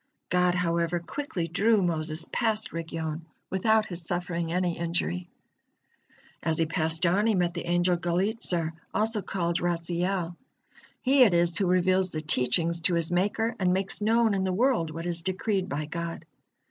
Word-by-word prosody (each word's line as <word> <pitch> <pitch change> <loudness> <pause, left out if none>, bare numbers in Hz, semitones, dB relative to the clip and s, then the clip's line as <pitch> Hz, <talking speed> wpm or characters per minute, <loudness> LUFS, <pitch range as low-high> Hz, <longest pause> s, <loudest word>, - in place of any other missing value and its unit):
God, 180 0 +3
however, 170 -1 0
quickly 175 -2 -4
drew 205 +5 +3
Moses 160 -1 -1
past 220 -2 +1
Rigyon 160 -1 -4 0.3
without 220 +3 +3
his 175 -3 -6
suffering 170 -1 -3
any 180 -1 0
injury. 165 - -2 1.1
As 160 -1 0
he 165 - +2
passed 160 +1 -1
on 195 +6 +3
he 220 - +3
met 175 -2 +1
the 170 -1 -5
angel 175 +1 +2
Gallizur, 175 -1 0 0.2
also 220 0 +1
called 170 -3 -1
Raziel. 175 +1 -1 0.7
He 270 +1 +4
it 210 -8 +6
is 170 0 +2
who 195 - +2
reveals 185 +1 +2
the 155 -3 -4
teachings 160 +4 +1
to 175 +2 +1
his 170 0 0
Maker, 210 +6 0
and 180 -2 +2
makes 190 +2 -2
known 225 +1 +3
in 190 -1 0
the 190 - 0
world 220 -4 +2
what 165 +2 -6
is 170 -1 -2
decreed 190 +1 -1
by 150 -1 -2
God. 170 +1 -5
175 Hz, 160 wpm, -27 LUFS, 165-190 Hz, 1.1 s, it